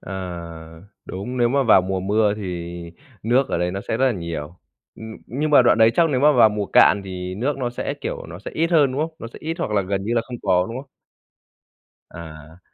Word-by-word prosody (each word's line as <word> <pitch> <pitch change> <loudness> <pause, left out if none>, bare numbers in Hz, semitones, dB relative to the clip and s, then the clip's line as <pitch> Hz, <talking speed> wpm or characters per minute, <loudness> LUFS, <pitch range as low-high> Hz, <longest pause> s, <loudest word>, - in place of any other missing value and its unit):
Ờ, 95 - -9 0.9
đúng, 100 +7 -6
nếu 120 -1 +3
mà 140 +2 +2
vào 110 -6 +5
mùa 95 0 -2
mưa 105 +2 +1
thì 90 -4 -6 0.5
nước 125 +5 +2
ở - - -1
đấy 90 0 0
nó 95 +1 -4
sẽ 110 - 0
rất 135 +2 +2
là 130 - +2
nhiều. 85 -3 -6 0.4
Ừm, 110 0 -9
nhưng 150 +6 -2
mà 140 -4 +7
đoạn 120 - +3
đấy 110 0 +6
chắc 170 -1 +3
nếu 130 -2 0
mà 150 +1 +5
vào 115 -4 +6
mùa 105 -1 -3
cạn 105 - +5
thì 90 -1 -6
nước 135 +7 -2
nó 120 -2 -2
sẽ, 120 - -4
kiểu, - - -5
nó 85 +1 -9
sẽ - - -8
ít 165 +2 0
hơn, 145 -6 +4
đúng 140 - -2
không? 160 +1 -3
Nó 115 - -7
sẽ - - -11
ít 165 +1 -3
hoặc 135 - -2
là 100 -2 +1
gần 95 +1 -3
như 115 - -1
là 115 - +3
không 125 - -5
có, 90 -1 +2
đúng 115 - -6
không? 140 - -16 1.2
À. 80 0 -11
110 Hz, 240 wpm, -22 LUFS, 90-130 Hz, 1.2 s, mà